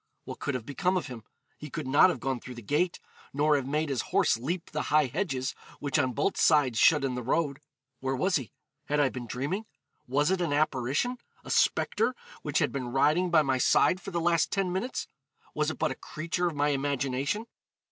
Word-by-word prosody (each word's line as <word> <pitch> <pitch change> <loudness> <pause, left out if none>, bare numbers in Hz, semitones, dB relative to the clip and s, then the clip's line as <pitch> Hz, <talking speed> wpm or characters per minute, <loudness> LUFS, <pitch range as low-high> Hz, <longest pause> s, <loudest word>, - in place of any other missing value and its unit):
What - - -7
could 140 - -2
have 120 -3 -4
become 180 +7 0
of 175 - -2
him? 125 -5 -8 0.4
He 150 - -8
could 155 +1 -5
not 145 +8 +6
have 155 - -2
gone 130 -1 -2
through 125 +1 -9
the 120 - -9
gate, 160 - 0 0.3
nor 150 +2 +3
have 135 -2 -1
made 150 +2 0
his 130 -5 0
horse - - +2
leap 165 +10 -4
the - - -2
high 150 0 +4
hedges, 135 -2 -2 0.3
which 145 +1 0
on 130 -3 +1
both 145 - 0
sides 140 -7 +4
shut 150 -3 +5
in 135 -2 0
the 125 - -3
road. 140 +3 0 0.4
Where 135 0 -1
was 185 +8 +2
he? 125 -8 -7 0.3
had 150 0 0
I 145 -2 +4
been 125 -2 -7
dreaming? 145 - -3 0.4
was 145 +6 +2
it 190 -1 +1
an 165 -5 0
apparition 150 - 0 0.2
a - - -7
spectre, - - +2 0.3
which - - -1
had - - +2
been 130 -3 -3
riding 155 +7 +3
by 160 -2 +5
my 130 -2 0
side 180 +8 +3
for - - -7
the 170 -3 -2
last 170 -1 +2
ten 195 -3 -1
minutes? 235 +8 -2 0.5
was - - 0
it - - -5
but - - 0
a - - -4
creature 170 +3 -3
of 165 - -3
my 145 +1 +2
imagination? 140 - -1
145 Hz, 215 wpm, -28 LUFS, 130-170 Hz, 0.5 s, not